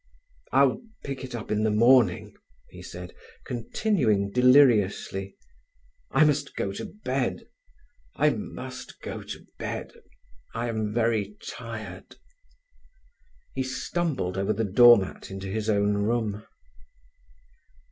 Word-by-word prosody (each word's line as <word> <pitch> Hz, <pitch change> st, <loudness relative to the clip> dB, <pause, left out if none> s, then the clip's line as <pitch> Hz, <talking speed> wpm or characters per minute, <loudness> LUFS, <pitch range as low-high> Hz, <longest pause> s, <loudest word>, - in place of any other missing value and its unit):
"I'll 140 Hz, -, +3 dB, 0.2 s
pick 135 Hz, -2 st, -5 dB
it 125 Hz, -2 st, -6 dB
up 110 Hz, -2 st, -6 dB
in 105 Hz, 0 st, +1 dB
the 110 Hz, -, +3 dB
morning," 115 Hz, -2 st, +4 dB, 0.4 s
he -, -, -11 dB
said, 90 Hz, 0 st, -9 dB, 0.3 s
continuing 115 Hz, -, 0 dB
deliriously: 115 Hz, -6 st, +3 dB, 0.7 s
"I 155 Hz, -, +4 dB
must 145 Hz, -1 st, 0 dB
go 95 Hz, -, -2 dB
to 100 Hz, -, -6 dB, 0.2 s
bed—I -, -, -3 dB
must -, -, -7 dB
go -, -, -6 dB
to -, -, -9 dB
bed—I 465 Hz, -, -7 dB
am 110 Hz, -2 st, -2 dB
very 110 Hz, -2 st, 0 dB
tired." 110 Hz, -6 st, -8 dB, 1.4 s
He 135 Hz, -, -2 dB
stumbled 130 Hz, -, -2 dB
over 100 Hz, +2 st, +1 dB
the 110 Hz, +2 st, -1 dB
door 120 Hz, +4 st, +8 dB
mat 95 Hz, -2 st, -5 dB
into 95 Hz, 0 st, -6 dB
his 110 Hz, +2 st, -2 dB
own 100 Hz, -1 st, +2 dB
room. 105 Hz, 0 st, -1 dB
110 Hz, 110 wpm, -26 LUFS, 100-130 Hz, 1.4 s, door